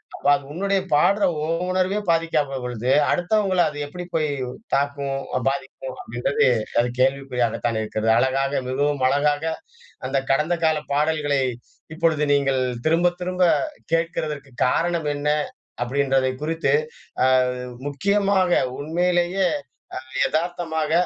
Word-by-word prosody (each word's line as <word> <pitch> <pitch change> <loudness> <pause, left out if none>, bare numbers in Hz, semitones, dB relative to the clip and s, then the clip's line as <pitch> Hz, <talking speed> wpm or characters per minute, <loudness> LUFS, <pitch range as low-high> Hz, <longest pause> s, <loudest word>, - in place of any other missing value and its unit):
அப்போ 145 - 0
அது 140 - -5
உன்னுடைய 195 +2 0
பாடுற 200 +7 +4 0.2
உன் 165 +2 -1
உணர்வே 185 +3 +1
பாதிக்காத 150 -5 0
பொழுது, 125 +1 -2 0.2
அடுத்தவங்களை 185 0 +2
அது 145 - -9
எப்படி 180 +4 -7
போய் 155 -1 +2 0.5
தாக்கும் 140 -1 -1 0.3
பாதிக்கும். 135 -1 -5
அப்படின்றது 120 +4 0 0.4
அது 125 - -1
கேள்விக்குறியாகத்தானே 125 -4 0
இருக்கிறது. 110 +1 0
அழகாக 135 +2 +1
மிகவும் 140 0 0
அழகாக 145 +2 +1 0.6
அந்த 135 +1 0
கடந்த 150 +5 +2
கால 160 -1 +3 0.2
பாடல்களை 145 -2 +1 0.5
இப்பொழுது 160 -3 +1
நீங்க 140 -1 +2 0.4
திரும்ப 170 +2 +3
திரும்ப 180 0 0 0.5
கேட்க்கிறதற்கு 155 -4 -2 0.2
காரணம் 165 +1 0
என்ன 145 +1 -1 0.5
அப்படி 125 +4 -2
என்பதை 135 -1 +2
குறித்து 165 +2 0 1.1
முக்கியமாக 195 +5 +1 0.3
உண்மையிலேயே 175 +4 +1 0.8
எதார்த்தமாக, 160 -2 -2
150 Hz, 110 wpm, -23 LUFS, 135-175 Hz, 1.1 s, பாடுற